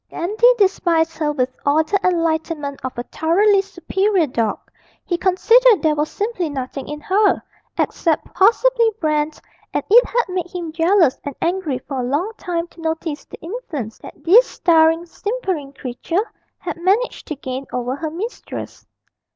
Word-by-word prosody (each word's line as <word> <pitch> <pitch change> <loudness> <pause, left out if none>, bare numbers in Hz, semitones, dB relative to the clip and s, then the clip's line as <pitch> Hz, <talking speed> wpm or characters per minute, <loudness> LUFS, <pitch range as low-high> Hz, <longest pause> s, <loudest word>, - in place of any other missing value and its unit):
Dandy 435 +8 +3
despised 340 -5 +2
her 300 -2 +1
with 255 -3 -1
all 295 +3 +3
the 395 +6 0
enlightenment 320 -4 -1
of 260 -1 -5
a 240 - -2
thoroughly 390 +9 +2
superior 390 -1 0
dog; 230 -6 -1 0.5
he 350 - 0
considered 430 +6 +4
there 310 -1 +3
was 300 +1 -1
simply 405 -6 -2
nothing 270 -1 -5
in 295 0 -5
her, 405 +6 +2 0.4
except 325 -3 0
possibly 465 +4 +4
bran, 305 -2 +1 0.5
and - - +1
it 480 +3 +8
had 485 0 +1
made 365 -2 -3
him 345 -3 -5
jealous 330 -2 +3
and 285 -2 -5
angry 340 -6 -1
for 265 +1 -6
a - - -1
long 290 - -1
time 340 -5 -3
to 335 - -15
notice 320 -2 -3
the - - -12
influence 320 - -6
that - - -13
this 450 +9 +6
staring, 325 0 +3
simpering 375 - -3
creature 280 - -3 0.3
had - - -6
managed 390 +8 0
to 305 - -4
gain 265 -1 -6
over 250 +1 -2
her 315 +2 -4
mistress. 395 +10 -7
335 Hz, 160 wpm, -20 LUFS, 295-390 Hz, 0.5 s, it